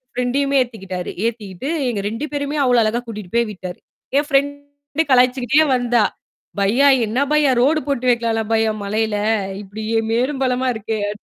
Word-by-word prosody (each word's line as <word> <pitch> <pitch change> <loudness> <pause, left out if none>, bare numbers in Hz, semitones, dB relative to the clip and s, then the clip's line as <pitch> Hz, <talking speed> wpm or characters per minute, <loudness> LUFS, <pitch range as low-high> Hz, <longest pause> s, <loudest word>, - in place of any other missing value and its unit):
ஃப்ரண்டயுமே 275 +3 +1
ஏத்திக்கிட்டாரு. 190 -7 -6
ஏத்திக்கிட்டு, 220 +1 -4 0.2
எங்க 205 -4 -2
2 230 +7 -4
பேரயுமே 285 +1 -2
அவ்வளோ 245 -2 +4
அழகா 220 +2 0
கூட்டிட்டு 210 -5 -8
போய் 235 -2 +2
விட்டாரு. 185 -2 -8 0.4
என் 290 +1 +1
ஃபிரண்டு 285 +2 -1
கலாய்ச்சுக்கிட்டே 255 +3 +4
வந்தா. 245 -3 +2 0.6
பையா, 240 +9 +4 0.2
என்ன 220 +4 -2
பையா, 295 -3 +4
ரோடு 305 +5 +3
போட்டு 260 -3 -1
வைக்கலாம்ல 230 -2 +1
பையா! 220 0 +2
மலையில. 215 +1 -1 0.5
இப்படி 205 +2 -8 0.3
மேடும், 260 +4 0
பள்ளமா 255 0 0
இருக்கே. 220 0 -3
அந்த 210 - -10
245 Hz, 150 wpm, -20 LUFS, 220-275 Hz, 0.6 s, அவ்வளோ